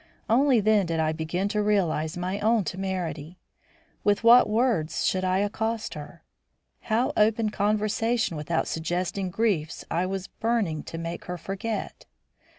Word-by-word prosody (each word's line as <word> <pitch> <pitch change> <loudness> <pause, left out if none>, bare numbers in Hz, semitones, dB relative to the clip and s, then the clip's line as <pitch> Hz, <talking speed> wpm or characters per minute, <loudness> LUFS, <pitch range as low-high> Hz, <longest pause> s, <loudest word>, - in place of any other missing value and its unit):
Only 255 +2 +4
then 210 -2 +3
did 165 -1 -1
I 155 0 +2
begin 160 +5 -2
to 210 0 0
realise 175 -6 0
my 185 +3 -2
own 220 0 +2
temerity. 180 -4 -4 0.7
With 205 +2 +2
what 235 0 +7
words 215 -8 +1
should 185 0 +1
I 185 0 +2
accost 220 +2 -2
her? 150 -1 -10 0.6
How 230 +4 0
open 215 0 +2
conversation 215 0 0
without 155 +2 -1
suggesting 180 +3 -2
griefs 180 -6 -1
I 175 +3 +1
was 190 0 -3
burning 215 -11 -1
to 165 - -7
make 165 +1 -5
her 180 0 -4
forget? 195 +6 -5
195 Hz, 145 wpm, -26 LUFS, 170-220 Hz, 0.7 s, what